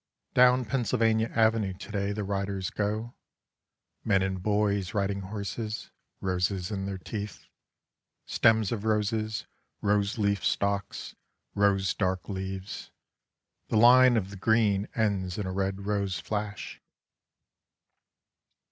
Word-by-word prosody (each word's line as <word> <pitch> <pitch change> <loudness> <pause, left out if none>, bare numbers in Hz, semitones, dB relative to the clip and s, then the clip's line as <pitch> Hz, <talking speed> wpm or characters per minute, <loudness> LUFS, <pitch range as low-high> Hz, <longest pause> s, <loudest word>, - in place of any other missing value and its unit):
Down 125 0 +5
Pennsylvania 115 -3 +1
Avenue 110 -3 +2
to 95 +4 -10
day 100 -1 -1
the 105 0 -3
riders 100 -1 -2
go, 110 +3 -2 0.9
men 100 -3 +3
and 95 -1 -2
boys 100 -1 0
riding 100 -1 0
horses, 105 +2 -5 0.3
roses 95 +1 -1
in 95 -1 -3
their 100 -1 -3
teeth, 100 +1 -6 0.8
stems 110 -3 +3
of 110 -3 -2
roses, 110 0 0 0.3
rose 100 +2 +1
leaf 100 -2 +1
stalks, 100 0 -1 0.4
rose 100 -2 +2
dark 95 -2 -1
leaves 95 -1 -5 0.8
the 110 - +1
line 125 +2 +7
of 100 -2 -2
the 100 - -8
green 105 -1 +2
ends 100 -5 0
in 105 - -2
a 95 - -3
red 95 +1 -2
rose 100 -4 -1
flash. 105 +4 -4
100 Hz, 120 wpm, -28 LUFS, 95-110 Hz, 0.9 s, line